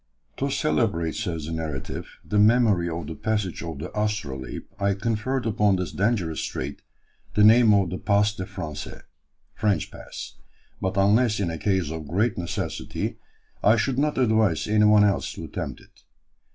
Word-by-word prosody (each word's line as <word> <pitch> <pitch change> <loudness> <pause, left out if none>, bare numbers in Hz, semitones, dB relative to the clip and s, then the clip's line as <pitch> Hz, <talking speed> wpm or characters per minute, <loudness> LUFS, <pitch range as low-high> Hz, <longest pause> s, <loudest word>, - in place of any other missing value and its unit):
"To 140 - -1
celebrate," 110 - 0
says 85 -8 -3
the 80 - -5
narrative, 80 -4 -4 0.2
"the 105 - +1
memory 105 -5 +4
of 85 0 -4
the 80 - -5
passage 105 -2 -2
of 80 -3 -5
the 80 +5 -6
Astrolabe, 75 - -3 0.2
I 100 0 +1
conferred 115 +5 -1
upon 105 -2 +3
this 90 -4 -3
dangerous 100 -7 0
strait - - -4 0.5
the 105 - +5
name 110 +1 +7
of 95 -4 +2
the 95 - -4
'Passe 105 0 +2
des 95 - -5
Français'" 75 -2 -7 0.5
(French 100 -5 0
Pass), - - -9 0.4
"but, 95 +1 -1
unless 105 +3 +3
in 90 -4 0
a 80 - -5
case 95 -6 0
of 80 -2 -6
great 105 +9 +1
necessity, 85 -1 -4 0.4
I 105 +3 +6
should 125 +4 0
not 150 +1 +1
advise 110 - +2
any 105 0 +4
one 105 0 +6
else 100 -1 +1
to - - -8
attempt - - -5
it. - - -22
100 Hz, 165 wpm, -25 LUFS, 85-110 Hz, 0.5 s, name